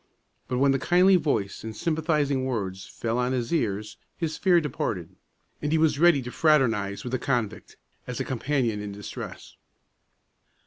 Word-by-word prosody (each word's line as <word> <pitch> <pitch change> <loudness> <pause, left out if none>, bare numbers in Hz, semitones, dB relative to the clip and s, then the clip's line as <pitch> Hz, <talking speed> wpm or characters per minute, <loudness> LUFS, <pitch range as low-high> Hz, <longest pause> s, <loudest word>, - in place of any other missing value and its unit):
But 125 - -1
when 135 +1 +4
the 135 - +1
kindly 180 +6 +5
voice 115 - 0
and 110 -1 -6
sympathizing 150 -3 0
words 100 -7 -3
fell 115 +1 -2
on 125 +1 +1
his 125 +3 -2
ears, 105 -7 -1 0.2
his 160 -2 -2
fear 180 -3 +4
departed, 105 - -3 0.5
and 150 - -1
he 160 - +3
was 155 -2 +2
ready 165 -5 +5
to 125 - -6
fraternize 115 -12 +2
with 125 - -5
the 130 - 0
convict, 120 -6 -2 0.3
as 125 -1 -4
a - - -1
companion 125 -4 -1
in 105 -1 -5
distress. 105 0 -8
130 Hz, 165 wpm, -26 LUFS, 110-155 Hz, 0.5 s, kindly